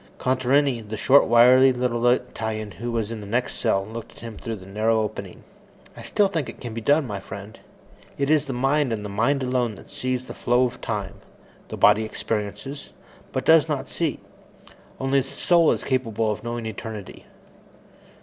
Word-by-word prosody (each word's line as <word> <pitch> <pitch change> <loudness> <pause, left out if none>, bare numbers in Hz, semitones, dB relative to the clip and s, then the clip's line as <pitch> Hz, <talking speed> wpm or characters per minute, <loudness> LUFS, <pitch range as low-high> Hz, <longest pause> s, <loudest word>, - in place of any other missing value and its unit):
Contarini, 130 0 +2
the 110 0 -6
short, 135 +6 +5
wiry 125 +3 +7
little 125 -1 0
Italian 110 -4 -1
who 120 +7 -5
was 115 -2 -2
in 115 -2 -5
the 100 - -9
next 120 +4 -1
cell, 100 -4 +1
looked 110 +2 -8
at - - -16
him 115 -1 -7
through 115 0 -5
the 95 -3 -12
narrow 110 +3 +1
opening. 105 -4 -5 0.5
"I - - -10
still 205 - +2
think 165 -8 -3
it - - -10
can 120 -2 -6
be 115 - -5
done, 145 +6 +3
my 105 -5 -4
friend. 100 +3 -10 0.6
It 140 - 0
is 155 0 +3
the 135 - -4
mind 135 +2 +1
and 105 -2 -3
the - - -5
mind 120 +7 +1
alone 125 -3 0
that - - -15
sees 130 0 -2
the - - -8
flow 120 +1 +2
of 120 +1 -5
time. 105 -5 -4 0.5
The - - -7
body 105 +1 +5
experiences, 110 +6 -5 0.4
but 130 - -3
does 160 -1 +5
not 140 -3 -2
see. 160 -7 -1 0.8
Only 135 +1 +2
the 135 0 -4
soul 170 +1 +3
is - - -2
capable 115 -4 0
of 105 - -5
knowing 120 0 -4
eternity." 110 -1 -7
120 Hz, 190 wpm, -24 LUFS, 110-130 Hz, 0.8 s, wiry